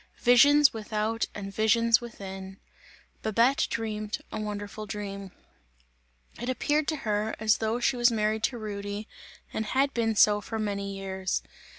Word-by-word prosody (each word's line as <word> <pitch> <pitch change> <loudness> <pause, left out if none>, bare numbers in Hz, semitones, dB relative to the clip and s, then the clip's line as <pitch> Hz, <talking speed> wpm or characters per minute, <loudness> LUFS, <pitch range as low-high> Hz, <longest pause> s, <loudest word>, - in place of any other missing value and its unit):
Visions 280 +4 +6
without 220 +1 -1
and 195 -1 -6
visions 230 +2 +3
within! 195 -4 -8 0.6
Babette 235 +7 +2
dreamt 215 -2 -3
a - - -4
wonderful 210 0 -5
dream. 200 -2 -6 1.1
It 240 - -3
appeared 295 +4 +1
to 315 - 0
her, 210 +1 0
as 215 0 +3
though 220 +2 -1
she 250 +1 +1
was 240 0 +5
married 215 -1 0
to 250 - -2
Rudy, 205 -1 -5 0.5
and 220 - -1
had 270 +5 +1
been 225 -2 0
so 210 0 +5
for 225 - -5
many 200 -2 -3
years. 190 -1 -3
215 Hz, 145 wpm, -28 LUFS, 205-235 Hz, 1.1 s, Visions